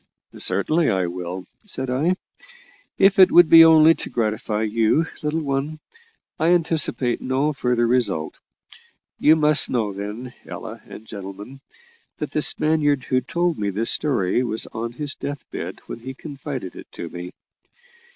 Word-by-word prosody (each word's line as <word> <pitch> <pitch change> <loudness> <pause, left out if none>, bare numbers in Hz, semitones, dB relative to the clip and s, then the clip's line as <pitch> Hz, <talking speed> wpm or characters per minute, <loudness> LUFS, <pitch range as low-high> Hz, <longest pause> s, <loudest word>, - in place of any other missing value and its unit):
"Certainly 160 0 +2
I 95 -1 +1
will," 90 +1 -6 0.2
said 130 -9 -2
I, 155 +8 +1 0.8
"if 195 0 +4
it 185 - +8 0.2
be 165 0 +10
only 160 0 +7
to - - -7
gratify 110 -1 -2
you, 115 +8 +2 0.2
little 155 +1 -2
one; 140 +2 -2 0.6
I 160 - +1
anticipate 160 -7 +1
no 135 +4 0
further 125 -3 0
result. 110 -10 0 0.8
You 155 - +5
must 150 -1 +2
know, 110 -5 -1
then, 105 +6 -7
Ella 115 0 -8
and 110 - -11
gentlemen, 100 +5 -9 0.6
that - - -5
the - - 0
Spaniard 145 -3 +2
who 130 0 0
told 170 +4 -1
me 100 -1 -1
this 105 +4 0
story 120 -8 +1
was 110 -2 -2
on 115 +1 -4
his 145 +2 -4
death 145 -1 -7
bed - - -6
when - - -8
he 130 +3 -8
confided 135 - -7
it - - -12
to 85 - -6
me. 90 +1 -7
130 Hz, 150 wpm, -22 LUFS, 110-150 Hz, 0.8 s, be